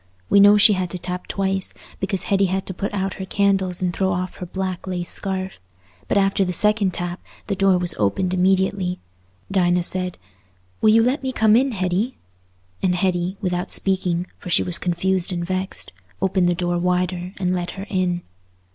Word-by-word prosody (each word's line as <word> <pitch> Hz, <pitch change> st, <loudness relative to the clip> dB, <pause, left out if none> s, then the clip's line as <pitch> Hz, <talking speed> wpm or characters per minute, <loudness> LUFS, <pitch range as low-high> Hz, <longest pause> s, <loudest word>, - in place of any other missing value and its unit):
We 200 Hz, -, +6 dB
know 205 Hz, +1 st, +8 dB
she 210 Hz, +1 st, +7 dB
had 185 Hz, -2 st, -1 dB
to 180 Hz, -, -5 dB
tap 180 Hz, +1 st, -4 dB
twice, 195 Hz, -1 st, -2 dB, 0.2 s
because 190 Hz, -1 st, -1 dB
Hetty 195 Hz, 0 st, +2 dB
had 190 Hz, +1 st, -1 dB
to 185 Hz, -, -5 dB
put 200 Hz, +3 st, -3 dB
out 195 Hz, -2 st, -2 dB
her -, -, -3 dB
candles 190 Hz, -2 st, +1 dB
and 180 Hz, -1 st, 0 dB
throw 190 Hz, +1 st, 0 dB
off 180 Hz, 0 st, -3 dB
her 180 Hz, -, -6 dB
black 190 Hz, 0 st, -4 dB
lace 180 Hz, -2 st, -3 dB
scarf; 190 Hz, -, -4 dB, 0.5 s
but -, -, +1 dB
after 195 Hz, 0 st, +3 dB
the 180 Hz, -, -1 dB
second 210 Hz, +1 st, +2 dB
tap 175 Hz, 0 st, -4 dB, 0.2 s
the 200 Hz, -, -2 dB
door 195 Hz, -1 st, +4 dB
was 180 Hz, -1 st, -1 dB
opened 180 Hz, -, +1 dB
immediately. 190 Hz, 0 st, +1 dB, 0.5 s
Dinah 180 Hz, -2 st, +3 dB
said, 180 Hz, 0 st, -1 dB, 0.6 s
"Will 215 Hz, -, +5 dB
you 225 Hz, +1 st, +6 dB
let 255 Hz, +4 st, +1 dB
me 265 Hz, -1 st, -2 dB
come 220 Hz, -3 st, +4 dB
in, 260 Hz, +2 st, +3 dB
Hetty?" 190 Hz, +5 st, -1 dB, 0.6 s
and 180 Hz, -1 st, +2 dB
Hetty, 180 Hz, 0 st, 0 dB
without 180 Hz, -2 st, -1 dB
speaking, 180 Hz, -2 st, 0 dB
for -, -, -8 dB
she -, -, +3 dB
was 180 Hz, -, +2 dB
confused 185 Hz, +1 st, 0 dB
and 175 Hz, -1 st, -2 dB
vexed, 185 Hz, +1 st, -3 dB, 0.3 s
opened 190 Hz, -2 st, +2 dB
the 175 Hz, -, +1 dB
door 175 Hz, 0 st, -1 dB
wider 180 Hz, 0 st, -1 dB
and 180 Hz, -1 st, 0 dB
let 175 Hz, -1 st, -2 dB
her 195 Hz, -, -5 dB
in. 180 Hz, -3 st, -1 dB
185 Hz, 190 wpm, -22 LUFS, 180-195 Hz, 0.6 s, know